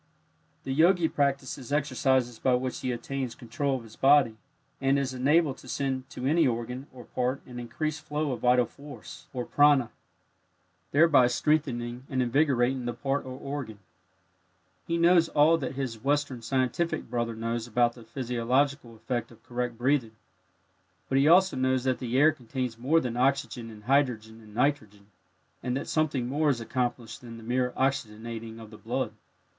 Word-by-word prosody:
The 135 - -3
Yogi 170 +3 +4
practices 140 -3 -1
exercises 130 -4 +1
by 130 -1 +3
which 125 0 -2
he 130 - -2
attains 125 +1 -4
control 130 +3 -2
of 120 - -10
his 110 -1 -14
body, 135 -5 +4 0.5
and 135 +1 +3
is 135 -2 -1
enabled 140 +3 +2
to - - -14
send 130 0 -2
to 125 - -6
any 160 +3 +4
organ 125 +3 -3
or 125 -1 -11
part 125 +2 -1
an 125 -1 -8
increased 155 +6 -3
flow 150 -1 -2
of 125 - -3
vital 125 +1 +4
force 145 +3 -12
or 125 -2 -4
"prana," 145 -5 +4 1.0
thereby 145 -4 +5
strengthening 125 -2 -1
and 130 - -1
invigorating 130 -1 +1
the 120 -1 -3
part 135 +3 -2
or 130 0 -6
organ. 135 -6 -5 1.1
He 170 - 0
knows 170 0 +5
all 160 +3 +4
that 135 -2 -4
his 130 -5 -4
Western 145 -3 0
scientific 135 +7 -1
brother 120 -1 -2
knows 115 +1 -3
about 120 0 +2
the 120 - -13
physiological 125 +2 -1
effect 120 +2 -3
of 115 - -18
correct 120 -1 -3
breathing, 125 -3 +1 0.9
but 135 - +3
he 140 - +4
also 185 +2 +5
knows 130 -1 +1
that 130 -1 0
the 125 0 -2
air 150 +3 +6
contains 125 -3 -4
more 135 +8 +2
than 125 -5 -3
oxygen 125 -2 0
and 105 -1 -12
hydrogen 115 -4 0
and 105 -1 -15
nitrogen, 110 -6 -1 0.5
and 125 +1 -1
that - - -5
something 145 -6 0
more 150 +4 +1
is 130 -4 +1
accomplished 120 0 -3
than 115 -2 -10
the 115 - -11
mere 125 +2 0
oxygenating 115 -3 -2
of 110 -1 -11
the 110 - -12
blood. - - -2
130 Hz, 165 wpm, -28 LUFS, 120-140 Hz, 1.1 s, air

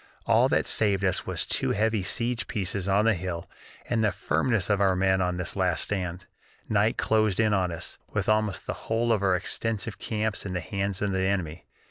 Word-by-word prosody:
All - - +4
that - - +2
saved 100 -3 +2
us 95 - 0
was - - -1
two - - +1
heavy 110 0 +1
siege 115 +5 -1
pieces 100 -2 -2
on 100 +2 +3
the 115 - +4
hill 85 -2 -4 0.4
and 115 -2 +1
the 105 - +3
firmness 90 - 0
of 100 -1 +1
our 95 -2 +3
men 95 0 +2
on 90 -1 0
this 90 -1 -4
last - - +1
stand. 90 -2 -3 0.4
Night - - +2
closed 110 -3 +2
in 110 -1 +3
on 90 -3 +1
us, 85 +1 -6
with - - -2
almost 110 -3 +1
the - - -2 0.2
whole 115 +1 +2
of 105 - 0
our 95 -2 +3
extensive 110 +4 -2
camps 110 -1 -2
in 95 - -5
the 90 - -1
hands 100 +2 -2
of 100 - 0
the 95 - 0
enemy. 95 -4 -2
100 Hz, 205 wpm, -27 LUFS, 90-110 Hz, 0.4 s, All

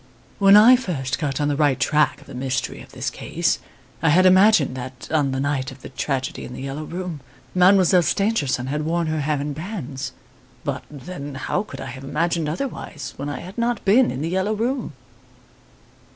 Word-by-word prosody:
When 200 0 +8
I 230 +4 +9
first 140 - -2
got 140 -2 -2
on 145 - +1
the 145 - +1
right 145 -2 +2
track 150 -1 +2
of - - -16
the 140 - -11
mystery 130 +1 -3
of - - -14
this - - -3
case - - -1 0.4
I 165 - +3
had 180 +5 +5
imagined 185 -7 +5
that, 130 -1 -7
on 150 -3 +2
the 135 0 -2
night 135 -1 -1
of 130 0 -14
the - - -8
tragedy 135 0 -3
in - - -8
The 125 - -7
"Yellow 140 +3 -5
Room", 175 -2 -5 0.3
Mademoiselle 185 0 +5
Stangerson 160 - 0
had 145 +3 -2
worn 165 +2 0
her 155 0 -1
hair 145 0 0
in 145 +1 -3
bands. 155 - -5 0.5
But - - -3
then, 145 0 -8
how 130 - -1
could 210 - -9
I - - -5
have 130 +1 -8
imagined 165 +2 0
otherwise 155 - -5
when 140 +2 -4
I 140 -3 -5
had 185 +6 -8
not 235 -1 -1
been 235 +6 +5
in 130 - -4
"The 165 - -1
Yellow 190 +4 0
Room"! 235 - -2
150 Hz, 195 wpm, -22 LUFS, 135-185 Hz, 0.5 s, I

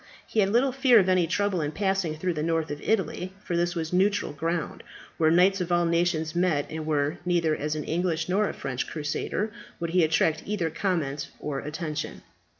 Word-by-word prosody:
He 220 - -2
had 195 -2 +4
little 245 +5 +3
fear 260 -2 +5
of 190 - +2
any 185 -2 +3
trouble 190 0 0
in 150 0 -2
passing 190 -4 0
through 180 +3 -1
the 155 - -3
north 165 -1 0
of 145 - -5
Italy, 190 -3 -1
for 175 - -2
this 175 +1 0
was 160 0 -3
neutral 200 -2 +2
ground, 165 +2 -2 0.4
where 160 -1 +4
knights 185 +3 +4
of 175 0 -3
all 175 0 +3
nations 170 -1 +1
met, 175 -5 +2
and 155 0 -5
where, 150 +1 0
neither 170 -3 +2
as 150 +1 -2
an 150 - -3
English 165 0 -1
nor 200 +3 +2
a - - -4
French 130 -2 -3
crusader 165 +7 -2 0.3
would 170 -1 -3
he 180 0 +4
attract 160 0 +2
either 185 -6 -2
comment 150 -6 -1
or 145 -2 -3
attention. 150 0 -5
170 Hz, 200 wpm, -27 LUFS, 155-185 Hz, 0.4 s, fear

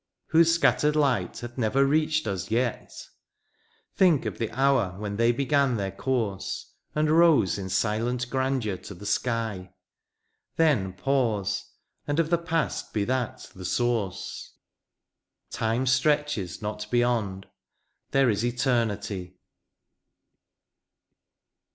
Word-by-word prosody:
Whose 165 +1 +5
scattered 150 -2 +3
light 140 -5 +1
hath 120 +1 -7
never 130 +5 +3
reached 155 +2 +1
us 95 -3 -3
yet! 120 +1 -1 1.0
Think 175 -7 +4
of - - -4
the 115 - -1
hour 125 -6 +1
when 100 0 -4
they 115 +1 +4
began 140 0 +1
their 100 -2 -2
course, 115 -7 -3 0.2
And 150 0 +2
rose 155 - +4
in 95 -1 -5
silent 115 +5 0
grandeur 130 -7 0
to 100 - -10
the 100 - -11
sky; 105 -5 -2 0.8
Then 130 - +2
pause 110 -2 -1 0.2
— - - -47
and 145 +2 0
of 165 0 +1
the 170 - +3
past 165 -2 -2
be 105 - +1
that 125 -1 -3
the 95 - -9
source 110 -1 -2 0.5
— - - -59
Time 115 +3 0
stretches 130 - +1
not 105 0 -4
beyond 115 -6 0 0.4
— - - -51
there 135 -3 +3
is 105 +2 -1
Eternity 110 -7 -1
120 Hz, 125 wpm, -26 LUFS, 105-140 Hz, 1.0 s, Whose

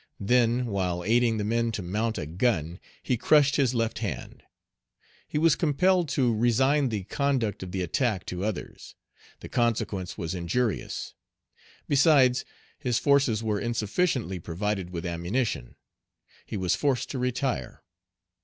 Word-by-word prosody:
Then, 120 +3 +2
while 90 -5 -2
aiding 115 +2 +2
the 105 - -1
men 115 +2 0
to 105 - -3
mount 110 +5 -1
a - - -3
gun, 85 0 -1 0.2
he 125 - 0
crushed 145 +3 +4
his 130 -3 +2
left 115 -1 -1
hand. - - -5 0.9
He - - -3
was 160 -1 +4
compelled 175 +2 +2
to 125 -4 +2
resign 130 +5 +3
the 105 -4 -3
conduct 120 -2 -1
of 95 -1 -6
the 95 0 -2
attack 105 - 0
to 90 +1 -4
others. 105 -2 -5 0.5
The - - -7
consequence 100 -6 -1
was 85 -3 -3
injurious. 95 +5 -2 0.7
Besides, 135 -3 +4 0.3
his 125 -5 0
forces 135 -6 +2
were 105 -2 0
insufficiently 120 - -1
provided 95 +3 -3
with 85 0 -5
ammunition. 85 - -2 0.7
He - - -4
was 90 -2 +1
forced 140 -4 0
to 135 - -3
retire. 125 - -2
115 Hz, 140 wpm, -27 LUFS, 95-130 Hz, 0.9 s, crushed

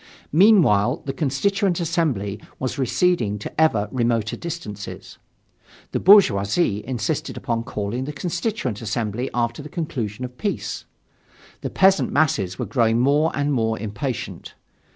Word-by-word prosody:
Meanwhile 160 - +4
the 135 - -3
Constituent 175 +7 0
Assembly 145 - -1 0.2
was 130 +1 -3
receding 130 - +1
to 105 +9 -4
ever 110 -10 +3
remoter 115 -3 0
distances. 105 - -7 0.7
The - - -1
bourgeoisie 105 - +4
insisted 130 +4 -3
upon 115 -3 -2
calling 105 +5 -3
the 150 - -4
Constituent 170 - -3
Assembly 115 +2 -2
after 120 +2 -1
the 150 - -9
conclusion 130 - -4
of 125 0 -11
peace. 205 - -3 0.8
The - - -3
peasant 190 0 +3
masses 95 - +1
were - - -2
growing 115 -3 +2
more 145 +5 +3
and 145 0 0
more 110 -3 0
impatient. 110 +5 -5
130 Hz, 130 wpm, -22 LUFS, 110-160 Hz, 0.8 s, Meanwhile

